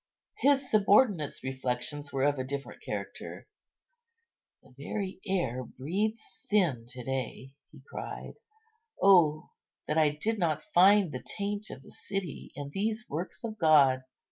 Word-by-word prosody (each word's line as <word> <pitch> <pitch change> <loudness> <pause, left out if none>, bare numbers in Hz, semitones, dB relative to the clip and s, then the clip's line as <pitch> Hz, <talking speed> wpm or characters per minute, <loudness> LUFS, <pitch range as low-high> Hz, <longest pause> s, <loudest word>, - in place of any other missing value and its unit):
His 275 -1 +3
subordinate's 205 - +3
reflections 130 +2 -2
were 135 -1 0
of 145 -1 +2
a - - 0
different 140 +1 -6
character: - - -6 1.2
"The - - -20
very 190 +8 -4
air 135 -10 0
breathes 200 - -2
sin 170 - 0
to 125 0 -7
day," 135 +1 -4 0.2
he - - -15
cried; - - -7 0.7
"oh 165 -6 +5 0.3
that 150 +2 +1
I 155 -1 +5
did 210 +10 -2
not 155 -4 0
find 195 0 +6
the 130 - -5
taint 205 +1 -3
of - - -9
the - - -14
city 195 -5 -5
in 140 0 -6
these 220 +6 -2
works 175 - -5
of 220 -2 -5
God! 140 -5 +5
155 Hz, 140 wpm, -30 LUFS, 135-205 Hz, 1.2 s, find